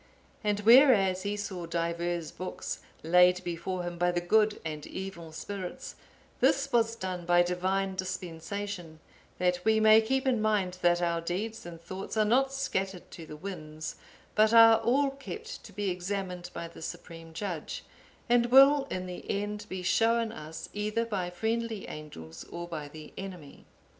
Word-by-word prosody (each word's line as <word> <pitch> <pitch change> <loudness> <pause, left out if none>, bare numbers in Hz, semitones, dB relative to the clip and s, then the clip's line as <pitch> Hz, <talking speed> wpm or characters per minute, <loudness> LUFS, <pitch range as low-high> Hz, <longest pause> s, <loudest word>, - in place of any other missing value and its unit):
And 210 -1 0
whereas 220 -6 +6
he 205 +1 -2
saw 185 -4 -5
diverse 170 0 -2
books 185 - -5 0.2
laid 180 +2 +5
before 175 +1 -3
him 175 -1 -5
by 175 0 +3
the 175 - 0
good 210 +4 +2
and 155 -1 -5
evil 185 -4 -7
spirits, 185 +3 -6 0.5
this 275 0 +2
was 230 -1 +3
done 185 -4 -4
by 175 0 +5
Divine 190 +2 0
dispensation, 185 -1 -5 0.4
that 180 0 +1
we 220 0 +4
may 220 0 +7
keep 265 +4 0
in 245 -4 +2
mind 200 -4 0
that 175 0 +3
our 170 -1 0
deeds 190 +4 -4
and 170 -1 -9
thoughts 185 +5 -6
are 215 - +4
not 265 +5 +3
scattered 195 -9 -3
to 165 -2 -10
the 150 - -8
winds, 155 -3 -6 0.4
but 215 +2 +4
are 225 -1 +9
all 270 +5 +2
kept 430 - -8
to 215 - -11
be 205 -1 -2
examined 180 -1 -4
by 170 - -6
the 165 - -13
Supreme 165 0 -8
Judge, 170 -2 -5 0.4
and 240 -1 +4
will 275 +3 +7
in 185 0 -3
the 180 -1 -7
end 205 +1 -3
be 185 -1 -5
shown 225 +4 +2
us 160 -2 -8
either 210 +2 -1
by 195 -6 -2
friendly 225 +3 -2
angels 80 - -9
or 175 0 -7
by 155 -4 -5
the 155 +1 -11
enemy. 180 -7 -9
185 Hz, 165 wpm, -29 LUFS, 175-220 Hz, 0.5 s, are